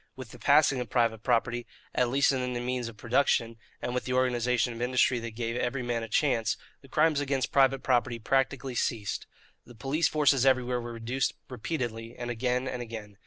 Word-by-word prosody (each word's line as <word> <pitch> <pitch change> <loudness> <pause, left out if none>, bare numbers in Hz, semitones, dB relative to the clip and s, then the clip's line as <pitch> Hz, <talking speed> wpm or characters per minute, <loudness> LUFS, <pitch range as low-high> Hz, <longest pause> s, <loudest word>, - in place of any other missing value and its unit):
With 130 -4 -9
the - - -12
passing 140 -2 +4
of 125 -3 -4
private 115 -2 +1
property, 120 0 0 0.3
at 125 -1 +2
least 140 +3 +3
in 125 -2 -1
the 120 - -2
means 125 0 -2
of 115 -2 -10
production, 115 -1 +1 0.3
and 120 - -2
with 125 - -2
the 125 - -2
organization 125 -1 +1
of 115 - -8
industry 125 0 +2
that 115 -1 -7
gave 115 0 -2
every 125 +1 -1
man 120 -1 -1
a 115 - -5
chance, 115 -2 +1 0.2
the 135 - -16
crimes 155 +2 +2
against 135 -2 -1
private 135 -1 +3
property 120 -1 +1
practically 135 +2 0
ceased. 110 -4 -2 0.4
The 120 - -15
police 135 +9 +1
forces 145 -4 +3
everywhere 125 -2 +2
were 120 0 -6
reduced 120 +3 -1 0.2
repeatedly 120 -3 -4
and 120 0 -4
again 125 +2 -1
and 125 - -4
again. 110 -4 -8
125 Hz, 195 wpm, -29 LUFS, 115-130 Hz, 0.4 s, passing